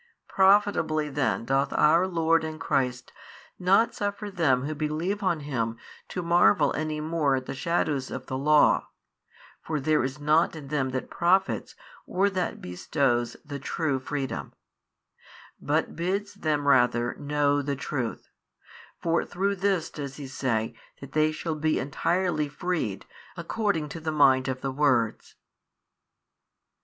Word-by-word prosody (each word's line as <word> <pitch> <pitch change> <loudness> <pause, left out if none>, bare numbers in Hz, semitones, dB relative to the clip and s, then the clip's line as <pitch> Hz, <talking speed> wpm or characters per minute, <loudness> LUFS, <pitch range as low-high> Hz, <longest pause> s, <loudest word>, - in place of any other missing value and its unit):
Profitably 190 -6 +3
then 135 -4 -1
doth 135 +2 +1
our 165 +4 +4
Lord 165 -2 +2
and 155 0 -5
Christ 125 -4 -1 0.5
not 195 +5 +3
suffer 205 0 -3
them 135 -9 +2
who 150 +2 -3
believe 155 +7 -2
on 175 -5 0
Him 115 -6 -2 0.3
to 180 - -4
marvel 170 -11 +4
any 155 0 -2
more 155 -3 +1
at 130 -1 -3
the - - -5
shadows 140 -1 -1
of 130 0 -6
the 130 - -4
law 150 +3 +4 0.7
(for 155 -2 -3
there 155 0 +2
is 130 +3 -4
nought 155 +3 +2
in 145 -3 -9
them 135 -3 0
that 130 0 -4
profits 190 +3 +1 0.3
or 200 +2 +1
that 185 -2 -2
bestows 120 - -1
the 140 -1 -6
true 140 0 -1
freedom) 135 0 -4 1.1
but - - 0
bids 195 +4 -2
them 150 -2 -1
rather 120 -3 +3
know 145 0 +1
the 140 0 -2
Truth; 130 -3 -4 0.8
for 165 0 +2
through 200 +2 -1
this 190 -3 0
does 140 -2 -6
He 145 - -7
say 120 -4 -2 0.3
that 140 -1 -10
they 155 +1 +2
shall 160 +1 -3
be 155 0 0
entirely 160 +2 0
freed, 150 - -3 0.3
according 170 -2 -1
to 165 - -7
the 160 0 -3
mind 135 -3 +4
of 130 -1 -3
the 135 - -2
words. 130 -5 0
150 Hz, 145 wpm, -27 LUFS, 135-170 Hz, 1.1 s, our